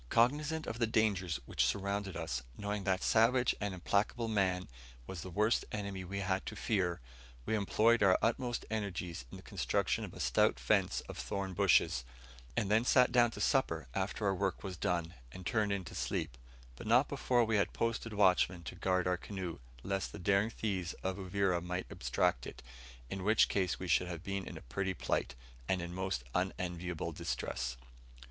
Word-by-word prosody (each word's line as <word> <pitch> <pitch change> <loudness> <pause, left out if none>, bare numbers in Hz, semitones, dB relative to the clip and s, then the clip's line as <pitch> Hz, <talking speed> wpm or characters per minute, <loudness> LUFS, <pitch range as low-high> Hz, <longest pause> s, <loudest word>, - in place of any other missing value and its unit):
Cognizant 150 +7 +2
of 115 - -5
the 115 - +3
dangers 100 -7 +1
which - - +1
surrounded 100 -1 -1
us, 80 -8 -2 0.2
knowing, 105 -1 -3
that 95 0 +1
savage 120 +2 +4
and 105 -1 -1
implacable 100 +5 0
man 95 -4 +1 0.4
was 85 +4 -6
the 95 - -6
worst 105 +5 +2
enemy 100 -3 -4
we 100 +2 -4
had 95 0 0
to 110 - -4
fear, 95 -6 0 0.5
we - - -1
employed 110 +2 +3
our 95 -2 +6
utmost 120 +1 0
energies 90 - -3
in - - -9
the - - -13
construction - - 0
of - - -7
a - - -9
stout - - +3
fence - - +2
of - - -9
thorn 95 +10 -3
bushes, 90 -9 +3 0.5
and 105 -4 +1
then 110 +2 +5
sat 125 0 +5
down 120 -1 +5
to - - -9
supper - - +1
after 95 +4 -2
our 100 - +3
work 95 0 -1
was 95 -2 -4
done, 85 -1 -1 0.2
and 95 +4 -9
turned 105 -1 +1
in 100 -2 -1
to - - -9
sleep; - - -2 0.4
but 65 - -8
not 125 +5 +5
before 125 -4 +2
we 110 -1 +2
had 100 - +1
posted 115 0 -1
watchmen 95 -3 +3
to 75 - -6
guard 90 -1 +1
our 90 0 +1
canoe, 95 -2 -5 0.2
lest 95 0 -2
the - - -8
daring 100 +3 +2
thieves 95 -6 -2
of 95 0 -1
Uvira 95 -2 0
might 90 +1 -3
abstract - - 0
it, - - -10 0.5
in 95 -1 -3
which 110 +2 +5
case 95 -3 0
we 95 - -5
should 90 +2 +3
have 85 -1 -6
been 100 0 -3
in - - -7
a - - -9
pretty 95 +10 -2
plight, - - -1 0.3
and 95 - +2
in 85 0 -5
most 95 -8 -2
unenviable 90 -2 -2
distress. - - -3
95 Hz, 185 wpm, -34 LUFS, 90-110 Hz, 0.5 s, our